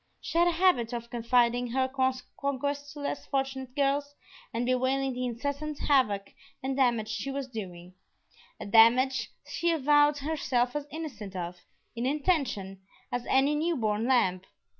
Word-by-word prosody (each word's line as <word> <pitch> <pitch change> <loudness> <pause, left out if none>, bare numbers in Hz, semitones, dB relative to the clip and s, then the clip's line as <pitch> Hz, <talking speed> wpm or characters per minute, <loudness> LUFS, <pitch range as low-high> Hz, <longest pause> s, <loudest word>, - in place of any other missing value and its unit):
She - - -7
had 345 - +5
a - - +4
habit 325 -10 +2
of 235 0 -5
confiding 240 0 +2
her 260 +2 +1
conquests 275 +2 -2
to 295 - -8
less 285 - -4
fortunate 270 -2 -3
girls 285 0 0 0.4
and 235 +2 -1
bewailing 260 +1 +1
the 250 0 -2
incessant 285 +5 -4
havoc 210 -11 +1 0.3
and 265 0 -1
damage 240 -5 +2
she 220 +4 -3
was 275 -1 -3
doing; 185 -7 -8 0.7
a - - -6
damage 240 +5 +5 0.2
she 340 - -1
avowed 295 -1 +4
herself 270 -4 -1
as 295 -1 -3
innocent 235 -12 -7
of, 175 0 -4 0.4
in 235 +2 -1
intention, 265 - -1 0.3
as 245 0 -3
any 275 +2 +3
new 325 +3 0
born 215 0 0
lamb. 190 -9 +3
260 Hz, 150 wpm, -29 LUFS, 235-285 Hz, 0.7 s, had